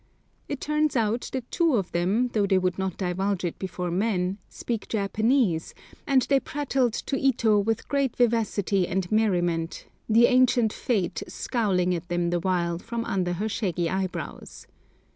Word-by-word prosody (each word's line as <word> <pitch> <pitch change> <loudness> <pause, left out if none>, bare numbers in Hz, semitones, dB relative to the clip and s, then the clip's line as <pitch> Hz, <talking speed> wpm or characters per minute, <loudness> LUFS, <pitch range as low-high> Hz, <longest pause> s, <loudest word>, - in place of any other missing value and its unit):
It 285 - -3
turns 300 -1 0
out 230 0 0
that 255 -2 -5
two 335 -6 +2
of 195 -5 -1
them, 195 +9 +1
though 210 -4 +1
they 190 -1 +3
would 185 0 0
not 190 -2 -2
divulge 190 0 -1
it 170 - -4
before 180 -2 -4
men, 190 0 0
speak 230 -3 -4
Japanese, 215 -3 +1 0.3
and 265 -2 +4
they 275 +2 +3
prattled 270 -4 -1
to 275 - -2
Ito 235 -5 +3
with 225 +2 -1
great 275 -3 0
vivacity 210 -6 +1
and 180 0 -2
merriment, 175 -6 0 0.2
the 230 +2 +6
ancient 250 -3 +3
Fate 205 -8 -1
scowling 185 -6 0
at 175 0 -4
them 175 0 0
the 175 - +1
while 170 -2 0
from 230 +4 -4
under 180 -2 -1
her 205 +5 -2
shaggy 180 -6 -1
eyebrows. 190 -1 -5
205 Hz, 160 wpm, -26 LUFS, 180-240 Hz, 0.3 s, the